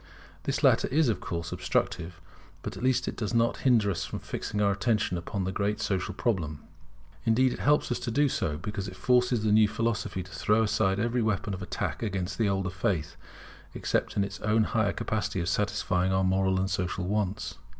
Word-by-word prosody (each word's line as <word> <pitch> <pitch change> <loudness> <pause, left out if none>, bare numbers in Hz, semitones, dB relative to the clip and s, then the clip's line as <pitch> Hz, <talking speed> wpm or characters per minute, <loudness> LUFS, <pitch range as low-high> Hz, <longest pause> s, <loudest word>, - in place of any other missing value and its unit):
This - - -1
latter - - +5
is 150 -1 +3
of 110 - 0
course 85 -1 -4
obstructive: 90 -1 -1 0.4
but - - -5
at - - -8
least 130 0 +2
it - - -3
does 110 +1 -3
not 115 0 +2
hinder 115 -6 +3
us 85 - -2
from - - -5
fixing 105 - -4
our 100 -1 +3
attention 100 -2 +1
upon 90 +3 -3
the 95 - -1
great 105 +2 -1
social 100 -1 -1
problem. 85 - -1 0.6
Indeed 125 +3 +3
it - - -7
helps 150 -2 +2
us 120 - 0
to - - -3
do 145 +5 +3
so: 75 - -1
because 100 +3 -4
it 95 - -8
forces 125 0 +2
the 110 - +2
new 105 0 +6
philosophy 105 -3 -2
to 90 - -14
throw 105 +4 +2
aside 105 -3 +1
every 120 +2 +1
weapon 105 -2 0
of 95 - -5
attack 90 - -3
against 100 -3 -3
the 110 -3 +3
older 95 -2 -1
faith 95 -4 -1 0.6
except - - -1
its 100 0 -1
own 110 +1 +2
higher 110 -2 +1
capacity 105 -3 -2
of 85 - -2
satisfying 95 -2 0
our 95 0 +2
moral 95 0 +2
and 95 +1 -1
social 90 0 -1
wants. 100 -1 -2
100 Hz, 200 wpm, -28 LUFS, 95-110 Hz, 0.6 s, new